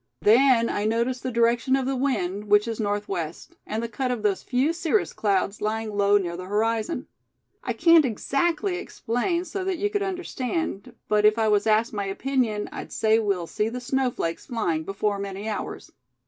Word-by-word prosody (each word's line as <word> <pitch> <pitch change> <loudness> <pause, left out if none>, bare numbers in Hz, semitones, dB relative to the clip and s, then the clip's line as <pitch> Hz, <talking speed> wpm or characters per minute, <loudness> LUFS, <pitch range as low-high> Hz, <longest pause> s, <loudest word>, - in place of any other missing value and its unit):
Then 235 +1 +5
I 205 - -1
notice 235 +3 0
the 255 - -3
direction 235 +3 +2
of 270 -1 0
the 270 +1 -1
wind, 210 -7 -1
which 210 +1 +4
is 230 -1 -4
northwest; 205 - -3
and 220 +2 -2
the - - -2
cut 255 +3 -2
of 245 -4 -2
those 200 -2 +1
few 265 +5 +1
cirrus 345 +4 0
clouds 200 -1 0
lying 215 0 -2
low 205 0 +4
near 175 -4 -2
the 185 +1 -7
horizon. 225 - 0 0.6
I - - -2
can't 335 -2 +6
exactly 320 - 0
explain 340 +3 -2
so 375 +3 -4
that 375 -1 -1
you 410 +3 -1
could 410 -1 0
understand, 325 - -3
but 210 0 +2
if 215 +1 +5
I 220 -1 +2
was 205 0 +2
asked 220 +2 +2
my 205 -1 -2
opinion, 220 0 -1
I'd - - -7
say 220 0 +3
we'll 200 -5 0
see 210 +6 -1
the 250 +2 -5
snow 265 +1 0
flakes 165 -8 -4
flying 170 -10 -1
before 200 +2 -1
many 200 +1 -5
hours." 215 - -5
225 Hz, 190 wpm, -25 LUFS, 205-265 Hz, 0.6 s, can't